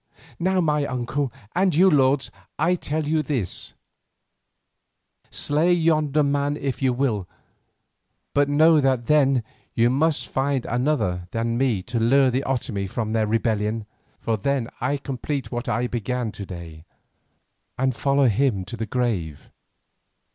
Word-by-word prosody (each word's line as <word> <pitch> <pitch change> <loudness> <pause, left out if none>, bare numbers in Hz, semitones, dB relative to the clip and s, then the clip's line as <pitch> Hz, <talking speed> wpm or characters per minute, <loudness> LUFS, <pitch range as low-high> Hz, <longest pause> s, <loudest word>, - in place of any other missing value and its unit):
Now 185 +2 +1
my 150 -3 +1
uncle, 130 +1 -2 0.2
and 185 -2 +2
you, 185 +4 +6
lords, 140 -4 +3 0.3
I 165 +4 +2
tell 155 -3 -2
you 155 0 +2
this: 130 - -3 1.5
Slay 155 +5 +1
yonder 155 -3 +2
man 145 +1 0
if 135 -2 -3
you 130 -1 +3
will, 120 -7 -1 1.1
but 145 0 +2
know 155 +2 +5
that 130 -3 +1
then 135 -4 +3 0.3
you 120 +1 +3
must 155 +3 +1
find 135 -1 -1
another 120 -9 0
than 115 +2 -1
me 120 -7 +1
to 120 +2 -3
lure 130 +3 +4
the 130 +3 0
Otomie 115 -7 -2
from 110 +1 -3
their 110 -1 +1
rebellion, 110 0 0 0.3
for 115 -1 -1
then 130 +2 -1
I 135 +4 0
complete 135 +1 -4
what 120 0 -3
I 120 +4 0
began 120 0 -2
to 100 -2 -8
day, 85 -4 -9 0.9
and 130 -1 0
follow 140 +3 +2
him 110 -4 +1
to 110 - -6
the 110 -1 -4
grave." 100 - -2
130 Hz, 140 wpm, -23 LUFS, 115-145 Hz, 1.5 s, you